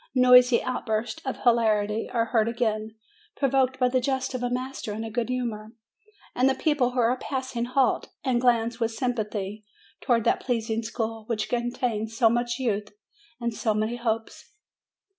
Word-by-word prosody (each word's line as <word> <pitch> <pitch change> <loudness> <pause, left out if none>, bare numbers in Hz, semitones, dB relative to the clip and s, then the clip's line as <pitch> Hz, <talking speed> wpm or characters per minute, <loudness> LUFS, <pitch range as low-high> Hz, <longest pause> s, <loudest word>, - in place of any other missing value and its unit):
Noisy 250 -1 +6
outbursts 220 -3 -2
of 265 - -4
hilarity 220 -3 +2
are 230 -2 +1
heard 225 -2 +1
again, 220 -2 -2 0.4
provoked 265 -2 +1
by 250 -1 +3
the 255 0 +1
jest 265 +1 -1
of 255 - -3
a 245 - 0
master 255 -3 -4
in 220 +2 -4
a 225 - -6
good 235 +1 -2
humor. 230 -4 -3 0.6
And 255 +2 +3
the 265 - +1
people 295 -6 +1
who 250 - -1
are 240 +1 +3
passing 260 -3 -3
halt, 255 +1 +1 0.2
and 250 -3 +1
glance 235 -1 +2
with 230 -1 +1
sympathy 220 -4 -3 0.4
towards 235 -4 +1
that - - +3
pleasing 230 -2 -1
school, 225 -1 -4
which 215 -2 -2
contains 235 -2 -2
so 225 -2 +5
much 240 0 0
youth 210 -5 -1 0.5
and 235 -1 -2
so 220 0 0
many 215 +3 -1
hopes. 225 -2 -3
235 Hz, 165 wpm, -26 LUFS, 220-250 Hz, 0.6 s, Noisy